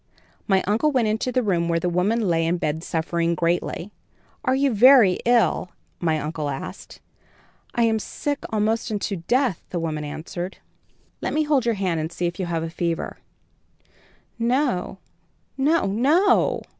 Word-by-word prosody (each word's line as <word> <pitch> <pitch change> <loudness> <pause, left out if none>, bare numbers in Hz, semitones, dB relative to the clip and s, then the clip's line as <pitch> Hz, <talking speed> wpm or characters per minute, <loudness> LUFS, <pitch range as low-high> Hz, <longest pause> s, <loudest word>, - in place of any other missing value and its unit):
"My 190 -2 +3
uncle 225 +10 +2
went 250 -5 +2
into 220 +4 -1
the 255 0 +1
room 170 -5 0
where 170 0 +2
the 180 - -2
woman 185 +7 +1
lay 165 -1 +1
in 175 +2 +1
bed 160 0 -2
suffering 170 0 -1
greatly. 170 +3 -1 0.5
"'Are 255 - +2
you 275 -1 +2
very 230 -4 +6
ill?' 235 -6 +2 0.3
my 160 -3 +1
uncle 150 0 -3
asked. 135 -1 -7 0.8
"'I 235 - +3
am 225 -1 +2
sick 285 +6 -3
almost 220 +2 0
unto 205 -1 -2
death,' 240 - 0
the 175 - -3
woman 155 -2 -3
answered. 175 +5 -6 0.6
"'Let - - -2
me 310 - +3
hold 285 -5 +1
your 230 - +2
hand 185 -4 -1
and 160 +2 -3
see 175 - -3
if 175 +2 -3
you 185 - -2
have 165 -1 -2
a 165 - -3
fever.' 170 0 -3 1.2
"'No, 240 -6 0 0.6
no, 300 +5 +2
no!' 310 - +3
195 Hz, 160 wpm, -23 LUFS, 170-245 Hz, 1.2 s, very